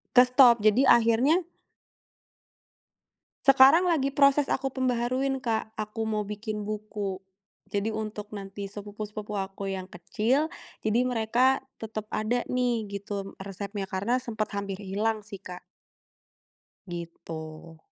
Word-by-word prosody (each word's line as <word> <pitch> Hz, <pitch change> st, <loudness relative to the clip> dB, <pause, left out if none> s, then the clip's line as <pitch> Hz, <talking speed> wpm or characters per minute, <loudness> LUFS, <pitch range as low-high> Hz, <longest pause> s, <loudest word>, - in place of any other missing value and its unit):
Kestop, 250 Hz, -1 st, +7 dB
jadi 215 Hz, +5 st, +4 dB
akhirnya 240 Hz, +10 st, +4 dB, 2.0 s
Sekarang 275 Hz, +7 st, +7 dB
lagi 275 Hz, -4 st, +1 dB
proses 280 Hz, 0 st, +5 dB
aku 270 Hz, -, -1 dB
pembaharuin, 260 Hz, +1 st, 0 dB
Kak, 220 Hz, -3 st, -2 dB
aku 215 Hz, +1 st, -4 dB
mau 215 Hz, -1 st, 0 dB
bikin 210 Hz, +1 st, -4 dB
buku. 210 Hz, -2 st, -4 dB, 0.6 s
Jadi 205 Hz, +2 st, 0 dB
untuk 215 Hz, -1 st, -5 dB
nanti 195 Hz, 0 st, -7 dB
sepupu-sepupu 210 Hz, +1 st, -7 dB
aku 195 Hz, 0 st, -4 dB
yang 190 Hz, -1 st, -4 dB
kecil, 230 Hz, -, 0 dB, 0.4 s
jadi 220 Hz, +2 st, +3 dB
mereka 245 Hz, +2 st, +3 dB, 0.2 s
tetap 215 Hz, -1 st, -5 dB
ada 240 Hz, +3 st, 0 dB
nih, 245 Hz, -3 st, 0 dB
gitu, 200 Hz, -1 st, -5 dB
resepnya. 200 Hz, 0 st, -5 dB
Karena 230 Hz, +7 st, 0 dB
sempet 220 Hz, -3 st, -2 dB
hampir 200 Hz, -1 st, -3 dB
hilang 210 Hz, +2 st, -2 dB
sih, 200 Hz, -4 st, -9 dB
Kak. 180 Hz, 0 st, -9 dB, 1.3 s
Gitu. 165 Hz, -2 st, -8 dB
215 Hz, 115 wpm, -27 LUFS, 200-245 Hz, 2.0 s, Kestop